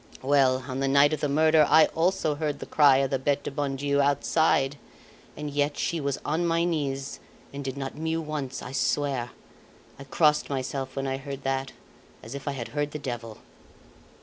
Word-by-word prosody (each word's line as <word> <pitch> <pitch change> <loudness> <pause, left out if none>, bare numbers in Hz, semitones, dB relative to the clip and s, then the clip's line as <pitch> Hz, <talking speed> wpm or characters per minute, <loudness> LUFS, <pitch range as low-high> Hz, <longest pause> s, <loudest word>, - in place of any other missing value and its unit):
Well, 130 -2 +3
on 130 -1 -4
the 135 - 0
night 140 +2 +5
of 155 - -2
the 150 - -1
murder 155 +2 +4
I 160 - +7
also 170 -2 0
heard 150 -1 -2
the - - -7
cry 145 -3 +5
of 135 -1 0
the 135 - 0
Bete 140 +1 0
du - - -4
bon 140 -1 -2
Dieu 140 +1 +1
outside; 140 0 +2 0.6
and 150 -1 -5
yet 145 0 0
she 165 -2 -1
was 140 -1 -1
on 160 +4 0
my 165 0 +2
knees, 140 -5 -2 0.3
and 140 0 -5
did 135 0 -5
not 135 -1 -4
mew 160 +1 -2
once, 150 -4 -5
I 125 - -7
swear. 135 -2 0 0.7
I 140 - -9
crossed 150 +2 +2
myself 135 -1 -3
when 135 0 -2
I 135 0 -1
heard 140 0 -7
that, 135 0 -2 0.5
as 115 - -8
if 140 0 -8
I 140 - 0
had 120 -4 -6
heard 145 0 -2
the - - -3
devil." 120 -6 -6
140 Hz, 200 wpm, -26 LUFS, 135-150 Hz, 0.7 s, I